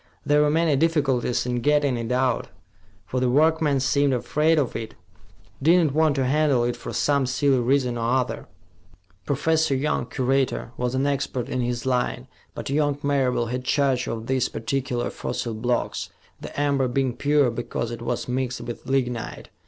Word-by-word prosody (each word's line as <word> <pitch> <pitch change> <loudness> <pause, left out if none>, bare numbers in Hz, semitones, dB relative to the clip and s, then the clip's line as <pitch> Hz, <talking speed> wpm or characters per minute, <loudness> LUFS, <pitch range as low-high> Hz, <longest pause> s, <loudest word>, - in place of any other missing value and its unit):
"There 150 0 +4
were 150 - +3
many 160 -1 +2
difficulties 140 -6 +1
in 125 -1 -1
getting 145 -1 +2
it 115 0 -4
out, 125 -1 +1 0.6
for 130 - -2
the 125 0 +1
workmen 155 +1 +3
seemed 140 +1 +2
afraid 155 +6 +1
of 140 -5 0
it, 115 -1 -5 0.7
did 165 +6 +5
not 145 - -1
want 155 -1 +3
to 135 -2 +1
handle 140 -2 +2
it 120 0 0
for - - -7
some 140 -3 +1
silly 135 +1 +2
reason 125 -1 +1
or 115 +2 0
other." 130 -2 -2 0.8
Professor 160 0 +1
Young, 135 -3 -1
curator, 130 -1 0
was 125 +1 -2
an 135 +1 +1
expert 135 -3 -1
in 130 - -1
his 120 0 -2
line, 125 0 -1 0.3
but - - -5
young 145 -1 +1
Marable 135 -4 +1
had 125 0 -3
charge 135 -2 +1
of 115 -1 -4
these 130 0 0
particular 125 +1 -2
fossil 115 - -4
blocks, 120 +3 -2 0.3
the - - -7
amber 140 -2 +2
being 130 0 0
pure 145 -3 +2
because 115 0 -4
it 115 - -6
was 120 0 -3
mixed 125 -1 -2
with 120 +2 -7
lignite. 125 -4 -2
130 Hz, 170 wpm, -24 LUFS, 125-145 Hz, 0.8 s, did